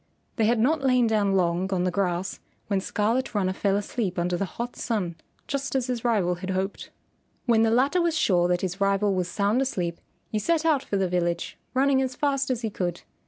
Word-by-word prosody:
They 225 - +3
had 235 +2 +3
not 285 +7 +2
lain 255 -2 +3
down 210 -3 +2
long 180 +1 +1
on 180 -2 +1
the 180 - +1
grass 185 -1 -1 0.3
when 200 -2 0
Scarlet 225 +5 -1
Runner 185 -2 +1
fell 195 0 +1
asleep 205 -2 -2
under 175 +1 0
the 195 - -1
hot 235 +6 -6
sun, 195 -8 -2 0.3
just 275 -1 -3
as 260 -2 +1
his 245 -2 -3
rival 205 -7 +2
had 180 +2 -6
hoped. 190 +1 -2 0.6
When 230 -3 +4
the 225 - +4
latter 275 +10 +3
was 335 -1 +1
sure 175 - +3
that 180 0 +1
his 190 +1 -3
rival 200 0 +2
was 180 -2 0
sound 205 +6 +1
asleep, 180 -10 -2 0.3
he 215 - 0
set 325 +8 +1
out 305 -5 +3
for 200 - -2
the 190 -1 +1
village, 175 -1 -1 0.2
running 270 0 +3
as 260 -1 -2
fast 275 -1 0
as 250 -3 -1
he 220 -2 -2
could. 175 -3 -3
205 Hz, 210 wpm, -26 LUFS, 185-250 Hz, 0.6 s, When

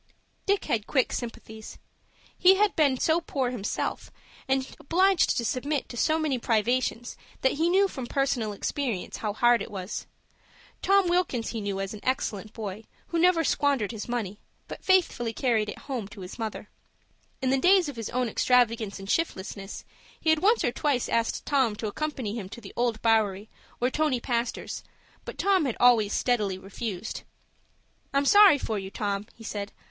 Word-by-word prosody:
Dick 400 0 +2
had 220 -2 -1
quick 260 -3 +1
sympathies. 220 -2 -7 0.6
He 375 +1 +6
had 415 0 +2
been 285 -5 +3
so 325 +1 +2
poor 265 -6 -2
himself, 220 -5 -3 0.4
and 265 0 -1
obliged 370 +4 +3
to 235 - 0
submit 280 +4 -1
to - - -8
so 310 +6 +2
many 300 -5 0
privations 240 +1 0 0.3
that 265 - +3
he 325 +4 +1
knew 390 +2 +4
from 260 -9 -6
personal 255 -6 0
experience 225 0 -3
how 215 - -2
hard 240 +2 +4
it - - -5
was. 190 0 -5 0.7
Tom 395 -1 +4
Wilkins 345 -10 0
he 225 - -4
knew 200 -1 -3
as 195 +1 -3
an 215 - -8
excellent 215 -5 -2
boy 215 -1 -6 0.2
who 340 - 0
never 345 -1 +4
squandered 275 -7 +1
his 220 0 -7
money, 215 -4 -3 0.3
but - - -9
faithfully 340 -11 +2
carried 225 -3 +1
it - - -6
home 250 -8 -5
to 205 -1 -11
his 180 +4 -9
mother. 220 -2 -4 0.7
In 260 0 0
the 270 - +3
days 365 +3 +5
of 290 - -6
his 225 -2 -5
own 250 0 0
extravagance 230 -3 +2
and 195 0 -9
shiftlessness 195 - -3 0.3
he 320 - +2
had 315 - +3
once 435 +7 +3
or 245 - +2
twice 270 -2 0
asked 230 0 0
Tom 260 -7 +2
to 220 - -5
accompany 255 -1 -3
him 210 -5 -5
to 235 - -9
the 205 -4 -11
Old 235 -2 0
Bowery 215 -3 +2 0.3
or 250 +2 +1
Tony 300 -4 +1
Pastor's, 235 -1 -3 0.4
but - - -7
Tom 385 -5 +3
had 250 - -2
always 230 -4 +5
steadily 210 -7 0
refused. 195 +1 -5 0.9
"I'm 280 0 +3
sorry 405 -1 +8
for 220 -6 -3
you, 190 0 -6
Tom," 200 0 -3
he 230 - -13
said. 205 -2 -5
240 Hz, 175 wpm, -27 LUFS, 215-290 Hz, 0.9 s, sorry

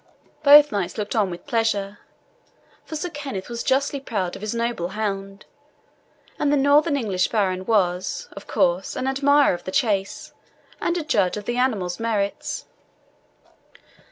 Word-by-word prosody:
Both 295 0 +8
knights 195 -2 -2
looked 210 +1 -3
on 210 -4 +2
with 175 0 -8
pleasure; 215 -5 -1 0.9
for 315 - -7
Sir 325 +3 -4
Kenneth 275 - -6
was 235 -1 -4
justly 275 +1 +1
proud 200 -9 -3
of - - -10
his 215 +2 -3
noble 230 -7 -1
hound, 195 0 -4 0.9
and 290 - +1
the 290 - +3
northern 285 +2 +4
English 195 -8 0
baron 190 -4 -1
was, 190 - 0
of - - -11
course, - - 0
an 260 - -3
admirer 280 0 +3
of 175 - -6
the 185 - -5
chase, 200 -4 -1 0.5
and 345 - 0
a 335 - -2
judge 205 - +1
of 205 - -7
the 240 +2 -2
animal's 210 -8 0
merits. 210 -3 -2
225 Hz, 155 wpm, -23 LUFS, 195-280 Hz, 0.9 s, Both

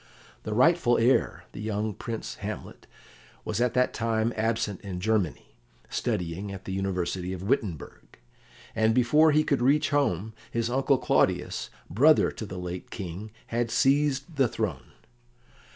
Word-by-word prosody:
The 105 - -4
rightful 130 -1 +4
heir, 120 +3 +2
the - - -8
young 110 0 -2
Prince 110 - -6
Hamlet, - - -7 0.6
was 110 +2 -1
at 125 0 +1
that 125 0 +2
time 115 0 0
absent 110 -3 -1
in 95 -3 -5
Germany, 95 - -1 0.4
studying 90 +4 -2
at 95 -1 -8
the - - -5
University 95 -1 -2
of 95 0 -6
Wittenberg, 100 - -3 0.6
and 110 0 +3
before 150 +6 +5
he 155 +1 +4
could 140 -4 0
reach 140 +5 +3
home, 110 - 0 0.2
his 115 0 -1
uncle 135 +1 +3
Claudius, - - +1 0.2
brother 145 - +4
to 110 - -7
the 95 - -7
late 90 0 -6
King, 95 +3 -6 0.2
had 120 0 -1
seized 140 +4 +1
the 135 -3 +4
throne. - - -4
110 Hz, 145 wpm, -27 LUFS, 95-130 Hz, 0.6 s, before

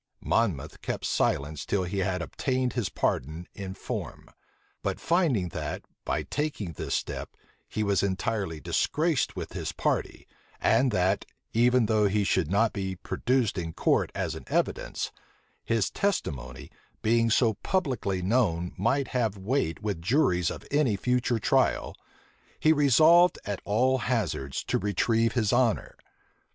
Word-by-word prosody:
Monmouth 80 - 0
kept - - -3
silence 75 +1 0
till 100 -2 0
he 90 +2 -3
had 90 -2 -1
obtained 130 +7 -1
his 120 -6 -1
pardon 80 +6 -2
in 95 -2 -6
form: - - -6 0.5
but - - -2
finding 155 - +1
that, - - -4 0.2
by - - -1
taking 145 - -3
this - - -3
step, - - -4 0.3
he 110 - -1
was 100 -2 +2
entirely 100 -3 -1
disgraced 155 - 0
with - - -6
his - - -3
party, - - -2 0.3
and 125 +4 +3
that, 95 -2 +1 0.3
even 120 +1 +4
though 105 -1 +3
he 105 +1 +1
should 95 -5 +1
not 105 +4 +2
be 95 -2 -3
produced 120 +3 0
in 80 -2 -4
court - - +1
as - - -2
an - - -8
evidence, - - -1 0.5
his 115 -5 0
testimony, 65 - -2 0.3
being 115 +1 +3
so 110 0 +3
publicly 125 - -1
known 90 -5 +1
might 130 +7 +1
have 115 -5 0
weight 100 - -1
with 100 -6 -2
juries 90 - +2
on - - -6
any 145 -7 +2
future 125 +3 +1
trial, 110 - +1 0.6
he 155 - +5
resolved 160 +5 +5
at 100 -2 -3
all 130 +5 +2
hazards 85 - -1
to 125 - 0
retrieve 115 +3 +1
his 110 -3 +1
honor. 120 -3 +1
110 Hz, 140 wpm, -28 LUFS, 95-125 Hz, 0.6 s, he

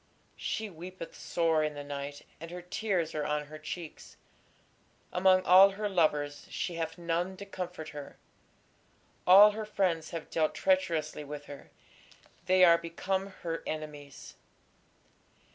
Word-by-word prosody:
She 220 - -3
weepeth 180 -1 -9
sore 165 -2 +1
in 150 -1 -2
the 145 - -6
night, 145 0 -6 0.2
and 165 +1 -8
her 180 +1 -8
tears 180 -3 -1
are 150 - -2
on 150 0 -1
her 155 +1 -10
cheeks: 160 +1 -8 1.0
among 185 0 +4
all 190 +2 +8
her 210 +1 -2
lovers 150 -6 0
she 175 - -3
hath 165 -1 -4
none 175 +2 -2
to 200 - -8
comfort 180 -5 -6
her: 145 -2 -9 1.1
all 200 +3 +9
her 215 +1 -5
friends 185 -6 -1
have 165 -2 -7
dealt 155 -1 +1
treacherously 165 - 0
with 145 0 -8
her, 145 -1 -11 0.8
they 185 0 +6
are 170 -1 +6
become 185 +3 -2 0.2
her 165 -1 -3
enemies. 150 -2 -7
170 Hz, 140 wpm, -30 LUFS, 155-185 Hz, 1.1 s, all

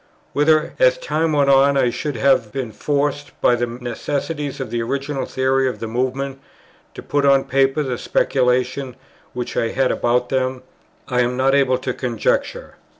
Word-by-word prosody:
Whether, 155 +2 +2
as - - +4
time 165 - -1
went 140 -2 +3
on, 140 +1 +4
I 125 -3 +2
should 145 +2 -4
have 125 -2 +2
been 130 -4 -4
forced, 145 +5 -2
by - - +4
the 120 0 0
necessities 135 +5 -4
of 130 -4 -5
the 120 -1 -1
original 140 +3 -3
theory 130 0 +1
of - - -6
the - - -5
Movement, 130 +4 -3 0.5
to - - -8
put 145 -1 0
on 140 -1 +4
paper 135 +2 +1
the 125 -3 -3
speculations 125 0 0 0.4
which 125 -1 -5
I 115 - +1
had 130 +2 +1
about 125 +1 0
them, 130 -1 -1 0.4
I 125 - 0
am 125 +1 0
not 135 +1 +2
able 135 -2 +3
to 130 0 -3
conjecture. 120 -4 -2
135 Hz, 170 wpm, -20 LUFS, 125-140 Hz, 0.5 s, as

